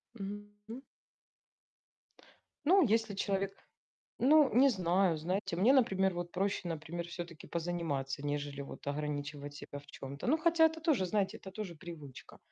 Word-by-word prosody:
Мгм, 205 0 -5 0.3
м. 245 +4 -6 1.8
Ну 380 +4 +6
если 220 -2 +1
человек 195 0 -1 0.7
Ну 290 +1 +6
не 265 +4 +6
знаю. 185 -4 +2
Знаете, 175 +2 -2
мне, 220 +9 +5
например, 190 -8 +3
вот 175 0 -4
проще, 195 -1 -1
например, 165 +1 -4
всё-таки 170 -2 -8
позаниматься, 160 -5 -2
нежели 145 -1 -2
вот 140 - -10
ограничивать 145 0 -3
себя 145 0 -8
в 145 - -18
чём-то. 140 - -7
Ну, 305 +5 +4
хотя 325 0 +5
это 320 0 -7
тоже, 300 - +2
знаете, 200 0 0
это 190 - -10
тоже 190 -2 -5
привычка. 150 -5 -10
180 Hz, 145 wpm, -33 LUFS, 150-215 Hz, 1.8 s, Ну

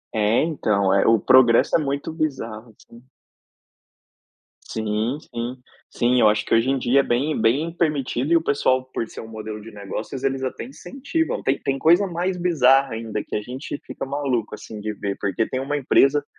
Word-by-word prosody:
É, 110 +4 +2
então, 100 - +1
eh, 100 - +3
o 115 -1 +5
progresso 130 -2 +5
é - - +4
muito 140 +2 -3
bizarro, 120 -8 -4
assim 120 +1 -17 1.7
Sim, 110 +4 -2
sim. 120 -3 -6 0.4
Sim, 125 +1 +2
eu - - +6
acho 105 0 +1
que - - -1
hoje 115 +3 +2
em 135 - +2
dia 130 +3 +3
é - - -5
bem 140 +6 0
bem 135 +9 +2
permitido 150 -3 -1
e 170 - +7
o - - 0
pessoal, 130 -3 +1
por 115 - -3
ser - - -9
um 110 - -10
modelo 110 -1 -7
de 115 +2 -11
negócios, 105 +6 -6
eles 135 -1 0
até 130 - -4
incentivam, 275 +5 -3
tem 135 +1 +1
tem 135 0 -1
coisa 175 +7 +4
mais 180 +2 -2
bizarra 140 -7 +3
ainda 110 -2 -4
que - - -6
a 105 - -1
gente 130 +5 -6
fica - - -6
maluco 130 -6 -2
assim 105 0 -10
de 110 +1 -3
ver, 100 -1 -4
porque 100 +3 -1
tem 130 - -3
uma 145 +2 -2
empresa, 140 +1 +3
130 Hz, 190 wpm, -22 LUFS, 110-145 Hz, 1.7 s, e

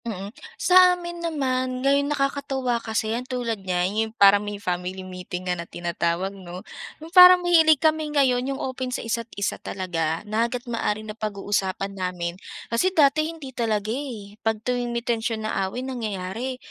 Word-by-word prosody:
Mm. 200 -2 -5 0.2
Sa 365 0 +6
amin 345 -1 -7
naman, 260 -5 -1
ngayon 280 +1 +3
nakakatuwa 275 -4 -1
kasi 220 -1 -2
'yan 235 - -1
tulad 235 -5 -2
niya, 180 -2 0
'yon 215 +4 -1
parang 200 0 +7
may 205 0 -5
family 185 -1 -4
meeting 180 0 -7
nga 180 - 0
na 170 -1 -6
tinatawag, 175 +2 -2
'no. 185 0 -10 0.3
'Yong 320 +2 -12
parang 365 0 +10
mahilig 320 -3 +6
kami 310 +1 +1
ngayon 265 -3 +2
'yong 275 - -2
open 260 -1 -4
sa 250 - -4
isa't 230 0 -2
isa 200 - -2
talaga, 165 -3 -3
na 220 +3 0
hangga't 250 +1 -5
maaari 215 -3 -2
napag-uusapan 200 -2 -2
namin. 180 -2 -3 0.4
Kasi 360 +11 +3
dati, 310 +1 +4
hindi 305 -6 -9
talaga, 220 -3 -1
eh, 220 -7 -7
pag 225 -1 0
tuwing 245 -1 -1
may 235 0 -3
tensyon 225 -2 -1
na 215 - -2 0.2
away, 250 +6 -5
nangyayari 230 0 -4
230 Hz, 170 wpm, -24 LUFS, 195-270 Hz, 0.4 s, parang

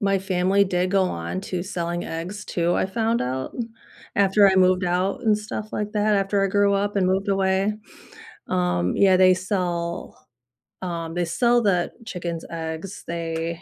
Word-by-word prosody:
my 195 -1 +2
family 190 +1 +2
did 185 -1 0
go 195 0 +3
on 85 - -3
to 180 -3 -3
selling 175 -2 -3
eggs 180 +6 -5
too, 175 0 0
I - - +1
found 225 +4 0
out, 130 +1 -3 0.6
after 200 0 +5
I 190 - +2
moved 185 0 +4
out 180 +2 0
and 215 -2 +3
stuff 210 0 -6
like 210 0 -2
that, 210 0 +2
after 195 0 +1
I - - +1
grew 200 +1 +3
up 200 +1 0
and 185 -2 +3
moved 190 +2 0
away, 195 +1 +2 0.8
um, 90 0 0
yeah, 190 -2 +5
they 185 0 +6
sell, 180 -2 -3 0.5
um 170 -2 -4
they 175 0 0
sell 240 +8 +2
the 185 -5 +1
chicken's 170 -5 -5
eggs. 165 +4 -6
They 165 0 -3
185 Hz, 170 wpm, -23 LUFS, 170-200 Hz, 0.8 s, they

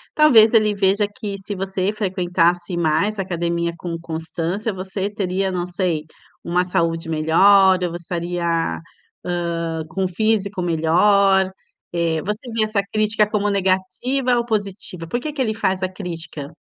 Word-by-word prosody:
Talvez 230 -8 +7
ele 215 -1 +4
veja 200 +1 +2
que 205 -2 -6
se 195 +1 -6
você 190 0 -1
frequentasse 180 -3 0
mais 170 +6 +1
a - - +2
academia 170 -2 -1
com 170 -2 -5
constância, 170 +5 -3
você 190 +2 -4
teria, 190 -1 -1
não 180 -1 -2
sei, 175 -4 -1 0.4
uma 180 +1 +1
saúde 165 -3 0
melhor. 185 +5 +5
Ou 175 - -1
você 170 - -4
estaria, 175 0 -3 0.8
ah, 170 -2 -2
com 190 +2 -1
o - - +1
físico 205 +1 0
melhor. 190 +4 +3 0.4
Eh, 165 -2 0
você 210 +5 -4
vê 225 -1 +1
essa 215 -2 0
crítica 215 0 +2
como 210 -1 0
negativa 200 +7 0
ou 235 - 0
positiva? 200 -6 -3
Por 240 - -2
que 305 +4 -4
que 290 -2 -3
ele 220 -4 0
faz 190 -4 -1
a 185 - 0
crítica? 165 -6 -6
190 Hz, 155 wpm, -21 LUFS, 170-205 Hz, 0.8 s, Talvez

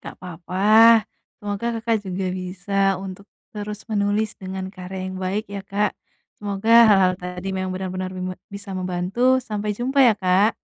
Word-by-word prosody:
Nggak - - -9
apa-apa. 180 +2 -5 0.7
Semoga 205 +2 -4
Kakak 225 0 +1
juga 185 +1 -3
bisa 185 +2 -3 0.2
untuk 190 +1 -8 0.3
terus 210 0 -6
menulis, 210 +1 0
dengan 190 0 -5
karya 185 +1 -7
yang 185 - -7
baik, 195 +4 -2
ya, 200 -1 -4
Kak. 205 +1 0 0.5
Semoga 205 +2 -1 0.2
hal-hal 195 -3 +5
tadi 180 +1 -6
memang 185 0 -2
benar-benar 185 0 -4
bime 185 0 -3 0.2
bisa 200 0 -9
membantu. 185 +8 +1
Sampai 210 -2 -3
jumpa, 260 +4 -1
ya, 230 - +5
Kak. 190 +3 +3
195 Hz, 150 wpm, -22 LUFS, 185-210 Hz, 0.7 s, hal-hal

